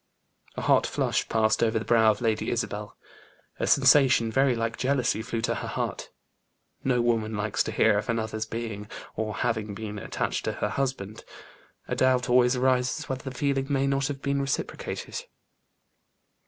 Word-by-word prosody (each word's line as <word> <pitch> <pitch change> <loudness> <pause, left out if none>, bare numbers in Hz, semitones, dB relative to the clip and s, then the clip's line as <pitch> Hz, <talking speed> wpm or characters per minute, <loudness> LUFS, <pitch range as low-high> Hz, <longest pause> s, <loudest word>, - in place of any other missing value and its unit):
A - - -4
hot - - +4
flush - - -1
passed 110 -1 +2
over 115 -1 +2
the 110 - -3
brow 115 -2 +5
of 105 +1 0
Lady 110 -2 0
Isabel; 105 -3 -3 0.6
a - - 0
sensation 130 -5 +5
very 135 0 +3
like 115 0 -2
jealousy 130 -4 0
flew 115 0 -3
to 120 - 0
her - - -5
heart. - - -3 0.7
No 125 -2 +2
woman 110 -2 0
likes 105 0 -1
to - - -3
hear 105 -2 +3
of 105 - -7
another's 110 -1 -2
being, 110 -3 -5 0.3
or 110 -1 -3
having 110 -4 -2
been 105 -1 -6
attached - - -3
to - - -1
her - - -2
husband: 125 -7 -3 0.6
a - - -2
doubt 130 -1 +2
always 125 0 +5
arises 130 +3 +1
whether 130 0 -4
the 130 - -11
feeling 135 -2 0
may 135 -1 +1
not 135 0 +1
have 140 -2 -6
been 140 0 0
reciprocated. 135 0 -4
120 Hz, 170 wpm, -27 LUFS, 110-130 Hz, 0.7 s, brow